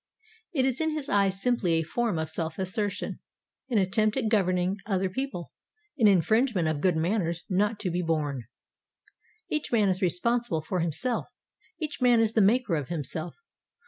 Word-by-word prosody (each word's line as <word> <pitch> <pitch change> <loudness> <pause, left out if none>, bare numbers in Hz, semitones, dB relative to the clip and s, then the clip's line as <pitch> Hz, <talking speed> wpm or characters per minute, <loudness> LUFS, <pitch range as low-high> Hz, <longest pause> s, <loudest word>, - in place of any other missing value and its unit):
It 270 -7 +1
is 265 +2 0
in 315 -1 0
his 300 -3 -4
eyes 195 -1 +2
simply 220 -7 +1
a 165 0 +2
form 220 +3 -1
of 160 0 -1
self 160 -1 -3
assertion, 195 +2 -2 0.5
an 240 - +1
attempt 210 +4 +2
at 230 -5 0
governing 185 -2 +1
other 190 -2 0
people, 255 -6 -4 0.4
an 230 -7 +4
infringement 205 - +3
of 155 -2 -1
good 185 -3 +3
manners 170 0 0
not 205 +3 +1
to 185 -4 -1
be 175 +1 -1
borne. 150 -7 -1 1.0
Each 305 -1 -2
man 215 -4 +3
is 185 0 0
responsible 190 0 0
for 180 +3 -2
himself, 170 - 0 0.5
each 305 -4 -4
man 245 -2 +5
is 225 -1 +2
the 225 - +4
maker 210 -2 +3
of 145 -3 -4
himself. 160 +1 -3
195 Hz, 170 wpm, -27 LUFS, 170-235 Hz, 1.0 s, man